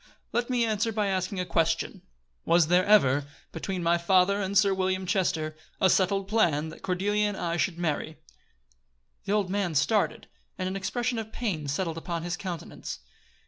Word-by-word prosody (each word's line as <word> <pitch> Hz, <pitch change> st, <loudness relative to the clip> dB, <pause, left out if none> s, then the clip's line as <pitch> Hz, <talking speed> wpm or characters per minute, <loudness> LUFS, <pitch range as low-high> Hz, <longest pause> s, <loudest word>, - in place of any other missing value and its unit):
"Let 240 Hz, +1 st, 0 dB
me 245 Hz, -2 st, +2 dB
answer 220 Hz, 0 st, 0 dB
by 210 Hz, -2 st, 0 dB
asking 185 Hz, 0 st, -1 dB
a 180 Hz, -, -1 dB
question: 165 Hz, -1 st, 0 dB, 0.4 s
Was 170 Hz, -2 st, +3 dB
there 180 Hz, +1 st, +5 dB
ever, 145 Hz, -10 st, +5 dB, 0.3 s
between 180 Hz, +2 st, -4 dB
my 170 Hz, +1 st, +3 dB
father 190 Hz, +3 st, +3 dB
and 195 Hz, +1 st, 0 dB
Sir 200 Hz, -1 st, +5 dB
William 185 Hz, 0 st, -1 dB
Chester, 165 Hz, -5 st, 0 dB, 0.2 s
a 190 Hz, -, +4 dB
settled 195 Hz, +1 st, +2 dB
plan 165 Hz, -8 st, +2 dB
that -, -, -12 dB
Cordelia 205 Hz, +3 st, 0 dB
and 205 Hz, -2 st, -3 dB
I 170 Hz, -1 st, -1 dB
should 175 Hz, 0 st, 0 dB
marry?" 160 Hz, -2 st, -2 dB, 1.1 s
The 200 Hz, -, 0 dB
old 200 Hz, -3 st, +1 dB
man 195 Hz, -5 st, -1 dB
started, 200 Hz, +8 st, +1 dB, 0.3 s
and 185 Hz, -, -2 dB
an 190 Hz, -, -3 dB
expression 240 Hz, +5 st, -1 dB
of 220 Hz, 0 st, -6 dB
pain 190 Hz, -12 st, -3 dB
settled 165 Hz, +3 st, -2 dB
upon 170 Hz, -1 st, -4 dB
his 175 Hz, 0 st, -2 dB
countenance. 175 Hz, -, -6 dB
185 Hz, 175 wpm, -27 LUFS, 170-205 Hz, 1.1 s, there